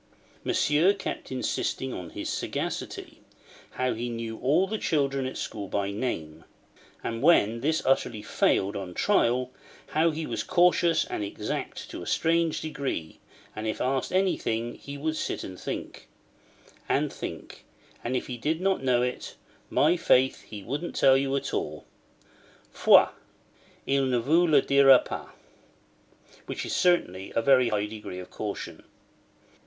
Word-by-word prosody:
Monsieur 160 +7 +3
kept 195 - -6
insisting 130 0 -2
on 90 -2 -6
his - - -6
sagacity: - - -4 0.5
how 130 0 -1
he 120 +2 -4
knew 115 -1 -5
all 145 +9 +3
the 215 +2 -3
children 140 -5 0
at 130 - -6
school 100 -2 -5
by 100 +1 -1
name; 80 -8 -4 0.6
and 115 0 -3
when 115 -8 +4
this 155 +3 +1
utterly 120 -5 +1
failed 100 +1 +1
on 95 -3 -6
trial, 125 - +2 0.4
how 160 +2 +3
he 160 0 -3
was - - -3
cautious 175 -2 +3
and - - -4
exact 100 - -4
to - - -6
a - - -8
strange 165 0 +1
degree, 140 - -4 0.4
and 110 +1 -4
if 110 - -2
asked 130 +1 0
anything, 120 -11 0
he 140 0 -9
would 155 +2 -2
sit - - -3
and 95 -1 -8
think—and - - -6
think, - - -8 0.4
and 120 +2 -2
if - - -4
he 125 - -5
did 155 +7 -1
not 190 -2 +1
know 125 -2 +3
it, 125 0 -4 0.3
'my 155 +4 +3
faith, 130 -6 +3
he 105 -2 -8
wouldn't 145 - -4
tell 135 - +5
you 135 0 +1
at 140 0 -3
all—foi, 75 0 0 0.8
il 135 0 +2
ne 130 -2 +1
vous 160 +9 +3
le 145 -4 +5
dira 140 -1 +7
pas': - - -6 1.2
which - - -4
is - - -3
certainly 95 - +1
a - - +3
very 130 -2 +5
high 105 -1 0
degree 105 -3 -7
of 90 0 -9
caution. 105 -2 -5
130 Hz, 150 wpm, -27 LUFS, 110-155 Hz, 1.2 s, dira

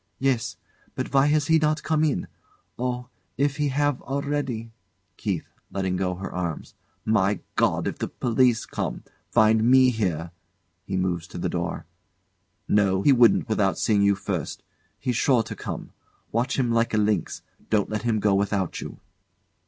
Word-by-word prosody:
Yes. 130 -4 0 0.4
But - - -4
why 135 +1 +5
has 150 0 +2
he 160 +1 +4
not 155 0 +1
come 155 0 +1
in? 145 - +1 0.5
Oh! 125 0 -2 0.3
If 140 +1 +1
he 150 -1 +1
have, 145 0 0
already! 135 -5 -3 0.5
KEITH. - - -2 0.2
[Letting 95 -2 -1
go 90 0 -1
her 95 +2 -6
arms] 85 -3 -4 0.3
My 100 -2 +2
God! - - +2
If - - -4
the - - -1
police 120 -1 +2
come - - -4 0.3
find 110 0 +4
me 130 +2 +6
here 85 -7 -2 0.6
[He 95 - -1
moves 90 -3 -1
to - - -9
the - - -1
door] - - -3 0.8
No, 100 -2 +2
he 145 - +6
wouldn't 120 -2 +5
without 105 -4 +1
seeing 105 -2 +2
you 100 0 +4
first. 95 -5 -4 0.3
He's 125 -2 -2
sure 125 -4 +3
to - - -7
come. - - -6 0.4
Watch 120 +3 0
him 125 -3 +1
like 115 -1 +1
a - - +2
lynx. 105 -4 0 0.3
Don't 105 -2 +1
let 105 -1 -1
him 115 -2 +1
go 105 -1 +2
without 100 -2 0
you. - - -7
110 Hz, 165 wpm, -25 LUFS, 100-130 Hz, 0.8 s, me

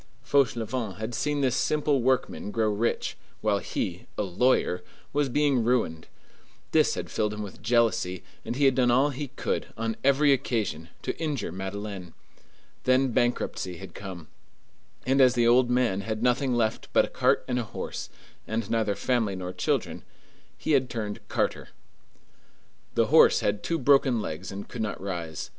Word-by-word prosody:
Fauchelevent 120 -5 0
had 110 +3 -4
seen 145 +5 0
this 130 -2 +2
simple 150 -2 +1
workman 130 -4 0
grow 110 0 +1
rich, 110 +3 -1 0.3
while 105 -2 +2
he, 90 -2 -4
a - - +1
lawyer, 95 -2 +1 0.3
was 145 -1 +1
being 140 -2 +2
ruined. 110 -10 0 0.6
This - - +3
had - - -5
filled 105 -1 0
him 105 - -4
with 100 - -9
jealousy, 115 -6 +1 0.2
and - - -4
he 140 +2 +2
had 135 - +5
done 125 -1 +3
all 135 +4 +4
he 140 +2 -4
could, - - -3
on 115 0 -1
every 140 +1 +5
occasion, 105 - -2
to - - -2
injure 150 - -2
Madeleine. 95 -1 -6 0.7
Then 130 0 +3
bankruptcy 115 -6 -1
had 95 -2 -10
come; 90 -5 -8 0.8
and 135 +2 +3
as 125 -1 +6
the 120 -1 +3
old 120 +1 +5
man 125 -6 +2
had 110 +2 -3
nothing 125 +1 +2
left 110 -2 0
but - - +5
a - - -8
cart - - +1
and 125 -1 0
a - - -1
horse, 110 - -6 0.4
and 110 -1 -2
neither 110 -3 +1
family 115 -6 0
nor 90 0 -5
children, - - -1 0.6
he - - -2
had 130 -3 +3
turned 105 -3 -4
carter. - - -1 1.3
The - - +4
horse - - +7
had 100 0 0
two 165 - -1
broken 135 -3 +4
legs 90 -1 -5
and 100 +1 -7
could 120 - -6
not 110 - -3
rise. 85 -5 -5
115 Hz, 165 wpm, -27 LUFS, 100-130 Hz, 1.3 s, horse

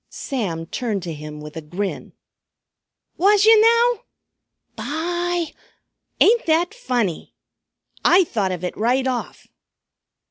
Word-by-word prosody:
Sam 185 -12 -4
turned 210 -1 -3
to 170 -2 -5
him 150 0 -9
with 150 0 -10
a 160 - -5
grin. 185 +6 -5 1.0
"Was 410 +3 +4
yer 445 0 +8
now? 465 +1 +4 0.7
By! 345 +2 -2 0.7
Ain't 460 -1 +4
that 335 +5 +2
funny? 245 - -2 0.7
I 370 +2 +6
thought 205 - -2
of 180 -1 -5
it 180 - -3
right 250 +4 +1
off." 255 -2 -4
255 Hz, 115 wpm, -21 LUFS, -, 1.0 s, yer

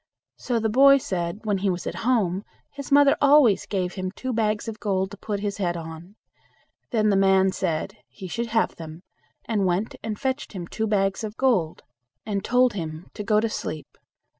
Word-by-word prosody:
So 240 -2 -1
the 220 - 0
boy 275 +5 +6
said, 180 -5 -3
when 205 -3 0
he 195 +1 0
was 180 -1 -3
at - - -3
home 210 -6 +1 0.3
his 280 0 -8
mother 285 0 +6
always 280 -7 +5
gave 185 -3 -2
him 185 -1 -3
two 255 +6 -5
bags 215 -1 0
of 220 -1 -6
gold 190 -2 -1
to 205 - -9
put 205 -1 -4
his 205 -1 -3
head 175 -4 -1
on. 165 +4 -9 0.7
Then 215 -3 +2
the 200 - +3
man 190 0 +4
said, 185 +3 -3
he 190 - -10
should 235 +6 -3
have 225 0 0
them, 160 +1 -9 0.4
and 210 -4 0
went 185 +5 -1
and 215 -2 -5
fetched 265 -1 -3
him 180 -3 -5
two 220 +5 -3
bags 195 0 0
of 215 0 -6
gold, 195 -12 +1 0.4
and 200 -2 -2
told 250 +1 +3
him 160 -3 -6
to 210 - -6
go 210 0 +3
to 225 - +1
sleep. 155 -7 -6
205 Hz, 195 wpm, -24 LUFS, 185-230 Hz, 0.7 s, boy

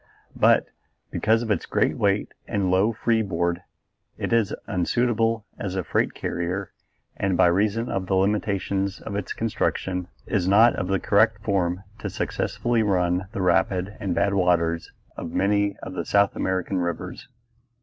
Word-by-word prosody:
But, - - +4 0.5
because 115 +2 +2
of 110 - -2
its 100 - -1
great - - +1
weight - - 0
and 95 -3 0
low 95 +4 +3
free 115 0 +1
board, 85 -3 -1 0.6
it - - -2
is 115 -4 +3
unsuitable 115 +2 0
as 95 -2 -3
a 95 - -1
freight - - 0
carrier 90 +3 -3 0.5
and 95 -2 0
by - - +6
reason 105 +6 +2
of 95 -1 -2
the 95 - +1
limitations 100 0 0
of 100 - -6
its 100 -3 -3
construction 95 -5 -1 0.2
is 95 -4 0
not 110 +5 +6
of 90 - -2
the 95 0 +1
correct 105 0 +3
form 95 -2 0 0.2
to - - -4
successfully 120 -1 -1
run 90 -3 +1
the 100 - -2
rapid 95 +2 +1
and 95 -4 -2
bad 100 0 +2
waters 85 -3 +1 0.3
of 85 - -5
many 100 0 +1
of - - -6
the - - -3
South 100 -1 +2
American 95 0 -1
rivers. 85 -1 -4
100 Hz, 160 wpm, -24 LUFS, 90-105 Hz, 0.6 s, by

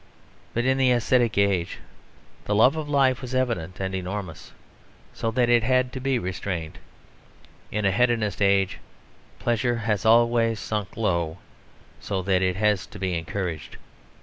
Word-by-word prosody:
But 120 +1 0
in 130 +1 +2
the 130 -1 +4
ascetic 120 -2 +2
age 100 -4 +1 0.7
the 105 - 0
love 125 +8 +5
of 155 -2 -4
life 135 -3 +2
was 130 0 -5
evident 115 -9 -1
and 95 0 -3
enormous, 95 -2 -5 0.6
so 115 - -2
that 120 +1 +1
it 120 -1 +4
had 130 +2 +1
to 130 - -4
be 135 0 0
restrained. 90 -4 -4 0.9
In 105 0 -1
an 95 - +3
hedonist 115 -3 +1
age 100 -1 +2 0.6
pleasure 120 +1 0
has 105 -4 -1
always 115 0 +3
sunk 105 -3 -4
low, 85 -6 0 0.6
so 95 -2 -3
that 95 -1 +2
it 95 -1 +1
has 105 -1 +1
to - - -11
be 95 -2 -2
encouraged. 85 -1 -4
105 Hz, 150 wpm, -25 LUFS, 95-120 Hz, 0.9 s, love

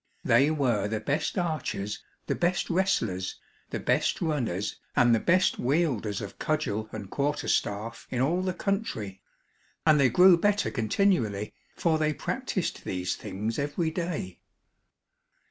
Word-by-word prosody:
They 140 - +4
were 125 -10 +1
the 110 0 -2
best 140 - -1
archers, 155 - -2 0.2
the - - 0
best 175 +1 0
wrestlers, 115 - 0 0.3
the - - -3
best - - +1
runners 125 - -1 0.2
and 120 -1 +5
the 115 - +4
best 185 +7 +2
wielders 125 - 0
of 100 - -8
cudgel 110 -9 -1
and 105 -3 -6
quarter 145 +8 -1
staff 110 +3 -1
in 125 - -2
all 160 +8 +2
the 185 -1 -2
country, 155 - -2 0.6
and 155 -2 +6
they 135 -2 +5
grew 180 +7 +7
better 205 +2 +2
continually, 110 - +1 0.2
for 160 -2 +1
they 155 0 +1
practiced - - -3
these 90 -1 -2
things 110 +6 -4
every 145 +3 -1
day. 160 - -4
140 Hz, 140 wpm, -28 LUFS, 105-170 Hz, 0.6 s, grew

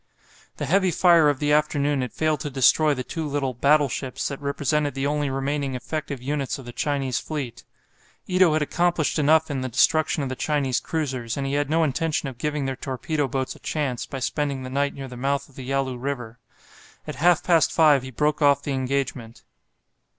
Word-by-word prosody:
The - - -3
heavy 190 +1 +3
fire 170 -3 +5
of 145 - 0
the 150 +1 0
afternoon 145 -2 +1
had 125 - -3
failed 155 -2 0
to 145 - -4
destroy 145 +3 +4
the 130 - -4
two 160 +4 -4
little 140 -2 -1
"battleships" 140 -1 +1
that 140 0 -6
represented 145 +1 -1
the 135 0 -2
only 145 0 0
remaining 135 0 -2
effective 140 0 -5
units 140 -1 -2
of 135 - -11
the 120 - -7
Chinese 135 0 -1
fleet. 140 -7 -5 0.6
Ito 185 -3 +3
had 155 -1 +2
accomplished 170 0 0
enough 155 +1 +3
in 135 -2 -2
the 130 - -3
destruction 155 +4 +2
of 135 - -3
the 130 - -3
Chinese 140 -3 0
cruisers, 130 -7 -3
and 140 - -2
he 135 - -2
had 145 0 0
no 165 +1 +3
intention 155 +1 -1
of 130 -3 -8
giving 150 0 -2
their 135 0 -2
torpedo 135 +3 -2
boats 130 0 -3
a - - -15
chance, 140 -6 -3
by 135 - -6
spending 140 0 -2
the 130 - -7
night 140 +1 0
near 135 -1 -7
the 125 - -9
mouth 140 +2 -1
of 140 - -22
the 130 - -8
Yalu 135 -2 0
River. 125 -3 -5 0.7
At - - -6
half 175 +1 +3
past 170 -3 +3
five 150 -4 +5
he 130 - -8
broke 150 +4 0
off 140 -1 +4
the 145 - -3
engagement. 130 -3 -3
140 Hz, 200 wpm, -24 LUFS, 130-150 Hz, 0.7 s, fire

